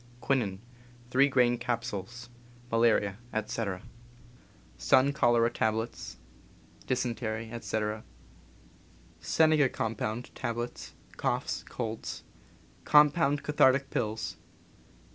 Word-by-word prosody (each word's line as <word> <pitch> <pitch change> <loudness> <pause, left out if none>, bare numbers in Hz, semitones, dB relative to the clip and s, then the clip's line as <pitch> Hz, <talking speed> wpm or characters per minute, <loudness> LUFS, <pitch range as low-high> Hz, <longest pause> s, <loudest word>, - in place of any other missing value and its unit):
^Quinin, 120 -8 0 0.5
3 135 +2 +5
gr. 125 -2 +3
capsules 120 -1 -4 0.2
— 120 0 -24
malaria, 115 -3 +2
etc. 110 -3 -3 0.9
Sun 140 +2 +3
cholera 120 -3 +3
tablets 110 +1 -2 0.3
— - - -26
dysentery, 115 -3 -2
etc. 110 -2 -3 1.2
Senega 155 -4 +3
compound, 110 +2 -3
tablets 120 +1 -5
— - - -23
coughs, - - -1
colds. 115 -2 -5 0.6
Compound 150 -1 +4
cathartic 135 -2 +3
pills. 110 -1 -2
120 Hz, 85 wpm, -29 LUFS, 110-130 Hz, 1.2 s, 3